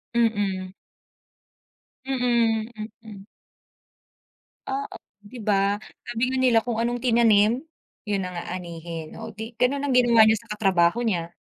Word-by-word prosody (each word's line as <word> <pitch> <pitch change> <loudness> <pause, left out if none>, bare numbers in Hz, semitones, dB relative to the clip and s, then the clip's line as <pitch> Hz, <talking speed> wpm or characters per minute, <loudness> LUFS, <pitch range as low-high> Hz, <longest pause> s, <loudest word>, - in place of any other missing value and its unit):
Mm. 200 -5 0 1.3
Mm, 235 -4 +1 0.4
mm. 205 -3 -11 1.4
Oo, 275 +1 -4 0.3
di 245 +5 -11
ba? 200 -1 +1 0.3
Sabi 235 0 -3
nga 260 - -1
nila 250 -3 +4
kung 235 -1 -3
anong 240 +1 -1
tinanim, 230 +2 +3 0.4
yun 205 -2 -1
ang 180 -1 -6
aanihin. 170 -2 -7
O, - - -8
di 225 +2 -8
gano'n 275 +3 +1
ang 280 -2 0
ginawa 235 -2 +6
niya 220 0 +4
sa - - -25
katrabaho 195 0 +2
niya. 175 -8 -1
220 Hz, 125 wpm, -24 LUFS, 195-240 Hz, 1.4 s, ginawa